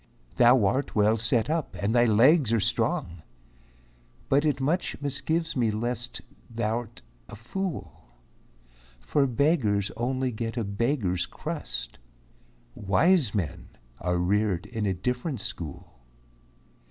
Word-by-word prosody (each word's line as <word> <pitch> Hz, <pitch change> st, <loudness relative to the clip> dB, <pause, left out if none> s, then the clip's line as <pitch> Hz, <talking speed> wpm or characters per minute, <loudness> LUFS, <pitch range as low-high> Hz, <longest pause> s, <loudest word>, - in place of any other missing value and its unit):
"Thou 120 Hz, -2 st, +6 dB
art 130 Hz, +8 st, 0 dB
well 105 Hz, +1 st, +4 dB
set 115 Hz, 0 st, +1 dB
up, 155 Hz, -9 st, -2 dB
and 100 Hz, +4 st, 0 dB
thy 120 Hz, 0 st, +5 dB
legs 120 Hz, +4 st, +5 dB
are 115 Hz, -, +3 dB
strong, 85 Hz, -4 st, -1 dB, 1.1 s
But 140 Hz, +3 st, +3 dB
it 145 Hz, -3 st, +1 dB
much 155 Hz, +7 st, -1 dB
misgives 160 Hz, +4 st, -1 dB
me 120 Hz, -4 st, +2 dB
lest 120 Hz, +2 st, -2 dB, 0.3 s
thou'rt 115 Hz, 0 st, -3 dB, 0.3 s
a -, -, -8 dB
fool; 175 Hz, -, -5 dB, 0.9 s
For 140 Hz, -, +1 dB
beggars 120 Hz, -, +1 dB
get -, -, -9 dB
only 130 Hz, 0 st, -1 dB, 0.2 s
a 120 Hz, -, -1 dB
beggar's 100 Hz, -2 st, -1 dB
crust, -, -, -6 dB, 0.7 s
Wise 120 Hz, -, +2 dB
men 85 Hz, -8 st, -3 dB, 0.3 s
are 90 Hz, 0 st, 0 dB
reared 95 Hz, 0 st, +1 dB
in 110 Hz, -4 st, -3 dB
a 95 Hz, -, +1 dB
different 125 Hz, -, -2 dB
school." 85 Hz, -, -7 dB
120 Hz, 120 wpm, -27 LUFS, 105-135 Hz, 1.1 s, Thou